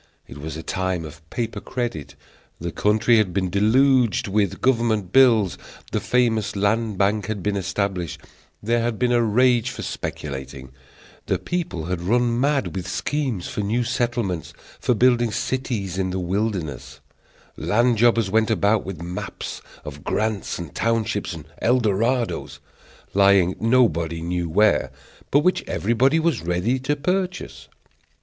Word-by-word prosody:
It 70 - -10
was 80 +1 -6
a 80 - -7
time 95 -3 -2
of 80 +2 -11
paper 115 +1 -3
credit. 120 - -4 0.4
The 85 +1 -4
country 110 +6 +3
had 100 -5 +1
been 95 -2 0
deluged 120 +2 +3
with 100 -1 0
government 115 -7 +1
bills; 115 -8 +5 0.3
the - - 0
famous 110 -4 +1
Land 105 +1 0
Bank 100 0 +1
had 105 -4 -4
been 105 0 0
established; 95 -3 -2 0.4
there 115 +2 +1
had 115 -1 -1
been 125 +1 +1
a 120 -1 +4
rage 120 +1 +3
for - - -6
speculating; 65 -2 -6 0.6
the - - +1
people 165 - -3
had 90 0 -3
run 120 +5 +1
mad 135 - +1
with 95 -2 -4
schemes 130 -11 -2
for - - -3
new 110 +4 0
settlements, 120 -8 -2 0.3
for 125 - +1
building 120 -1 +3
cities 105 -8 -2
in 95 -1 0
the 90 - -3
wilderness; 85 - -3 0.6
land 120 +1 +2
jobbers 115 -4 +3
went 110 +1 +3
about 105 -1 +2
with 90 -3 -7
maps 90 +1 -6 0.2
of 75 -1 -8
grants 110 -2 -1
and 85 -4 -7
townships 115 -2 -1
and 80 -2 -9 0.2
Eldorados, 120 +1 +1 0.6
lying 100 -2 +4
nobody 95 -9 +2
knew 85 0 -2
where, 105 +6 +3 0.4
but 145 - +4
which 185 +4 +1
everybody 120 - +2
was 160 -6 +1
ready 90 +10 0
to 145 +3 -1
purchase. 180 - -3
105 Hz, 145 wpm, -23 LUFS, 90-120 Hz, 0.6 s, bills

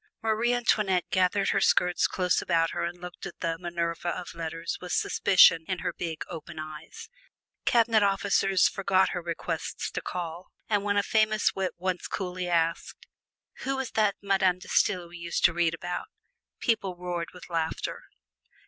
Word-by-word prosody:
Marie 225 +2 +2
Antoinette 210 -7 +2
gathered 185 +1 +2
her - - +2
skirts 180 0 +3
close 180 -1 +1
about 165 -2 +1
her - - -2
and 175 +1 -4
looked 180 0 -8
at - - -11
the 165 -1 -1
"Minerva 170 -1 -2
of 180 +1 -5
Letters" 165 0 -4
with 180 - -7
suspicion 180 -4 +5
in 185 - -1
her - - -3
big, 165 -3 -4
open 165 -3 -8
eyes; 155 - -8 0.6
cabinet 230 -2 +4
officers 195 -1 +3
forgot 190 -1 +2
her 180 - -3
requests 170 -1 -4
to - - -3
call, 175 0 -5 0.2
and 205 -2 +1
when 205 0 +1
a 200 - +3
famous 215 -1 +2
wit 190 -1 -2
once 180 0 -2
coolly 180 -1 -3
asked, 165 -1 -1 0.5
"Who 270 +1 -2
was 265 -2 -3
that 210 -2 +2
Madame 190 -2 +2
De 185 - -13
Stael 180 -3 +2
we 175 +1 -11
used 170 0 0
to - - +5
read 165 -1 +1
about?" 175 - -5 0.5
people 200 -6 0
roared 175 -1 -4
with 180 -1 -12
laughter. 165 -2 -3
180 Hz, 165 wpm, -28 LUFS, 170-200 Hz, 0.6 s, suspicion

